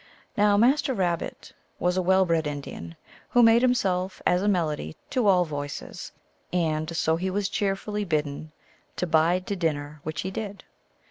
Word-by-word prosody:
Now, 205 0 +4
Master 265 +4 +3
Rabbit 175 -4 -2 0.2
was 180 0 0
a 185 - +2
well 190 +1 +4
bred 165 -3 +1
Indian, 140 - -6 0.3
who 245 - +5
made 230 +1 +6
himself 195 -7 +1
as 180 +1 +3
a 205 - 0
melody 155 - 0 0.2
to 245 -5 +1
all 180 -2 +5
voices, 145 -2 -6 0.4
and 160 -2 -1
so 160 +1 +2
he 185 +2 -2
was 200 +1 -1
cheerfully 205 +1 -2
bidden 155 -3 -2 0.4
to - - -1
bide 170 +2 +2
to 200 - -2
din 165 -5 +1
ner, 145 +1 -8
which 155 +1 -4
he 190 - -4
did. 205 0 -6
180 Hz, 170 wpm, -26 LUFS, 155-205 Hz, 0.4 s, made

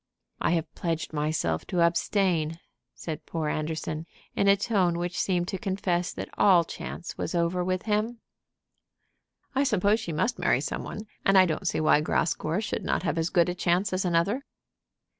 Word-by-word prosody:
"I - - +1
have 165 -2 -2
pledged 165 -2 -3
myself 150 - -1
to 180 - 0
abstain," 170 -2 +1 0.4
said 160 -2 -6
poor 160 -2 -2
Anderson, 155 +1 -3 0.3
in 200 - +2
a 200 0 +6
tone 195 -5 +1
which 175 0 -3
seemed 175 -2 0
to 190 - -3
confess 180 -2 -1
that - - -6
all 180 -4 +6
chance 170 +1 -7
was 165 - -2
over 170 +1 +1
with 185 0 -1
him. 220 +2 0 1.4
"I 270 +1 +2
suppose 210 -3 +2
she 195 -7 -5
must 185 +10 0
marry - - +3
some - - -3
one, 210 - -6 0.2
and 195 0 +4
I 185 - +8
don't 175 +3 -2
see - - 0
why 155 -1 +4
Grascour 160 +3 0
should - - -3
not - - 0
have 165 - 0
as 165 +1 0
good 170 -2 +3
a 180 - -1
chance 180 +2 +1
as 185 +2 0
another." 180 +9 +1
175 Hz, 180 wpm, -27 LUFS, 165-195 Hz, 1.4 s, I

